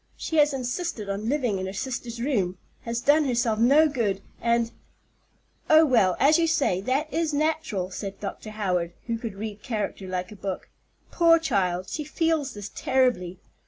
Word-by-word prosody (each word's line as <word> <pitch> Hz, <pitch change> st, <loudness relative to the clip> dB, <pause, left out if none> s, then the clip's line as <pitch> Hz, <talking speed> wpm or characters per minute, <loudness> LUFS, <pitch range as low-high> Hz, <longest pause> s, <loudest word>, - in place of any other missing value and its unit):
She 320 Hz, -, -3 dB
has 295 Hz, 0 st, +5 dB
insisted 255 Hz, -, -3 dB
on 205 Hz, +3 st, -2 dB
living 250 Hz, -9 st, 0 dB
in 190 Hz, -, -3 dB
her 190 Hz, -, -5 dB
sister's 240 Hz, +1 st, -4 dB
room, 205 Hz, -9 st, 0 dB, 0.3 s
has 230 Hz, 0 st, -2 dB
done 295 Hz, +3 st, +4 dB
herself 235 Hz, -4 st, +1 dB
no 280 Hz, +7 st, +6 dB
good, 220 Hz, -9 st, -1 dB, 0.2 s
and——" 235 Hz, 0 st, +1 dB, 1.0 s
"Oh, 315 Hz, +1 st, +7 dB
well, 215 Hz, -, +3 dB
as 305 Hz, +4 st, +5 dB
you 330 Hz, -, +3 dB
say, 280 Hz, -, +1 dB
that 270 Hz, +8 st, -1 dB
is 320 Hz, -2 st, 0 dB
natural," 305 Hz, -, -1 dB
said 195 Hz, +1 st, -6 dB
Dr. 210 Hz, +1 st, -6 dB
Howard, 180 Hz, -5 st, -1 dB
who 230 Hz, -1 st, -2 dB
could 225 Hz, -4 st, -5 dB
read 210 Hz, 0 st, -6 dB
character 210 Hz, -5 st, -3 dB
like 180 Hz, 0 st, -3 dB
a -, -, -9 dB
book. 195 Hz, -1 st, -5 dB, 0.4 s
"Poor 335 Hz, -1 st, +5 dB
child, 185 Hz, -, 0 dB
she 305 Hz, -, -4 dB
feels 305 Hz, -3 st, -1 dB
this 205 Hz, -1 st, -7 dB
terribly. 245 Hz, -9 st, +1 dB
235 Hz, 170 wpm, -26 LUFS, 195-295 Hz, 1.0 s, Oh